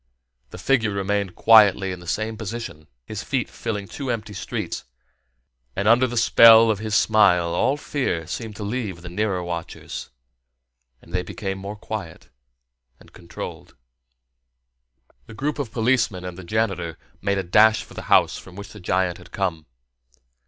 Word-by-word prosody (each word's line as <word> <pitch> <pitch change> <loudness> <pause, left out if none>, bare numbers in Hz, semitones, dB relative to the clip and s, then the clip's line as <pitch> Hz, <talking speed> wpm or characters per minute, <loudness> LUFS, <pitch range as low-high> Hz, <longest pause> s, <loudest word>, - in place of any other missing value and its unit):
The - - -10
figure 125 -5 +1
remained 100 -2 -2
quietly 100 -4 +5
in 90 - -6
the 90 - -13
same 110 +5 -2
position, 110 -8 -7 0.2
his 105 +7 -5
feet 130 -2 -1
filling 105 -2 -5
two 135 +4 -6
empty 110 -3 -3
streets, - - -4 0.9
and 100 +2 -1
under 120 +3 +5
the 120 0 -5
spell 115 0 +7
of 105 - -2
his 110 -1 -2
smile 90 -7 +4
all 135 +11 +1
fear 130 - -2
seemed 110 +5 -6
to 105 - -6
leave 100 -5 -4
the 85 - -7
nearer 95 -1 -1
watchers, 85 -1 -6 0.9
and - - -16
they 90 - +1
became 95 +2 -5
more 100 +2 -6
quiet 105 -5 -7 0.7
and - - -19
controlled. 85 - -9 1.5
The - - -11
group 145 +4 -2
of 130 -6 -3
policemen 115 -6 +1
and 90 -1 -6
the 95 - -10
janitor 90 -5 -2 0.2
made 100 0 0
a 95 - -1
dash 110 +5 +4
for - - -15
the - - -6
house - - +4
from 95 - -14
which 100 +1 -9
the 105 - -12
giant 90 -1 0
had - - -15
come. 85 -6 -2
105 Hz, 160 wpm, -23 LUFS, 90-110 Hz, 1.5 s, spell